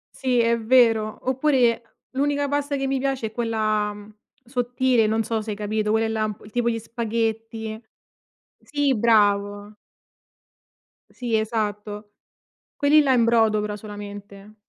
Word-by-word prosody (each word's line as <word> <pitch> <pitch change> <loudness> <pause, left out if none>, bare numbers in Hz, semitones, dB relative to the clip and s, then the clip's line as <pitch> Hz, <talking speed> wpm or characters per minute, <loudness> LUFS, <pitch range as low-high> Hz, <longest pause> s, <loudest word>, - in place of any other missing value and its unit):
Sì 255 -2 +1
è 235 0 +3
vero, 225 -2 +3
oppure 255 -4 +1
l'unica 285 +1 0
pasta 285 0 -1
che 270 -1 -1
mi 270 0 0
piace 265 -3 -1
è - - -10
quella, 215 -2 -1
mhmm, 205 +1 -13 0.3
sottile, 245 -1 +1
non 220 +1 +1
so 225 0 -2
se 215 0 -5
hai - - -3
capito 210 +1 -1
quelle 225 +1 +2
là 220 -1 -1
un 215 -1 -4
p 210 - -15
tipo 235 +2 0
gli 230 -1 -2
spaghetti 225 -1 -3 0.8
sì 290 -2 0
bravo. 205 -2 +2 1.3
Sì 235 -3 -2
esatto, 210 -1 -3 0.6
quelli 295 +2 +5
là 275 -3 +3
in 240 -2 +4
brodo 225 -2 +3
però 210 0 -3
solamente. 205 0 -10
225 Hz, 145 wpm, -23 LUFS, 210-245 Hz, 1.3 s, quelli